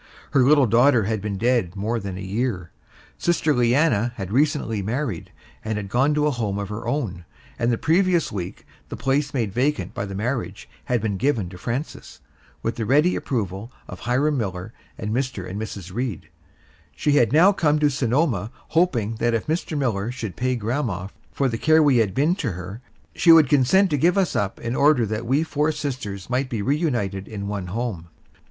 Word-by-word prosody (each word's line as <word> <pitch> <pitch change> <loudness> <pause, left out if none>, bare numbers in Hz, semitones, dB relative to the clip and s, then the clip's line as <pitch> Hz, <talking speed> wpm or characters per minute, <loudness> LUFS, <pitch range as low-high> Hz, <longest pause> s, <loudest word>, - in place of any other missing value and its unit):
Her 140 - +4
little 140 +1 +5
daughter 120 +1 +4
had 110 0 -2
been 100 -1 -3
dead 115 -5 +1
more 110 +4 -1
than 95 -3 -6
a - - -6
year. 100 -3 -3 0.5
Sister 165 -3 +1
Leanna 120 -2 +2
had 95 -3 -6
recently 135 -5 +1
married 115 - -3 0.3
and 105 -2 -3
gone 135 +7 +2
to 150 0 +2
a 150 - +2
home 110 -6 -2
of 100 -1 -4
her 105 +2 -6
own, 115 -10 -2 0.4
and 115 +1 +2
the 115 - +1
previous 175 - +2
week 90 -3 -6 0.2
the - - -6
place 140 +2 0
made 115 -8 -2
vacant 145 +6 0
by 100 - -3
the 100 - -6
marriage 110 -3 -3 0.2
had 120 -3 0
been 100 -3 -1
given 115 -7 0
to 90 - -10
Frances, 125 - -5 0.4
with 115 +1 -2
the 115 - -2
ready 150 +7 +4
approval 105 -2 -3 0.2
of 90 - -9
Hiram 135 +5 +1
Miller 95 0 -4 0.2
and 105 -1 -4
Mr. 125 -6 -2
and 100 +3 -5
Mrs. 100 -4 -7
Reed. 120 -5 -4 0.7
She 150 - 0
had 120 -6 +4
now 175 +7 +6
come 155 -5 +2
to 150 -1 +2
Sonoma 130 -2 0 0.2
hoping 120 - +1
that 120 +1 +1
if 115 - -2
Mr. 160 0 -2
Miller 115 -5 -1
should 110 -6 -6
pay 130 0 0
grandma 110 -5 -2 0.2
for 140 - 0
the 115 -3 -3
care 155 0 +5
we 140 -4 +4
had 105 -5 +1
been 150 +6 +3
to 125 - -2
her, 90 +6 -8 0.3
she 170 - +5
would 160 -3 +7
consent 155 +8 +4
to 145 - +2
give 175 +6 +3
us 190 -5 +1
up 100 -2 -1
in 115 +2 -3
order 140 -4 +4
that 110 +2 -4
we 140 +5 +2
four 150 -1 0
sisters 125 -11 -5
might 130 +1 -1
be 115 -5 -3
reunited 120 - -1
in 100 -2 -6
one 100 -3 -4
home. 100 -4 -4
120 Hz, 195 wpm, -23 LUFS, 100-145 Hz, 0.7 s, would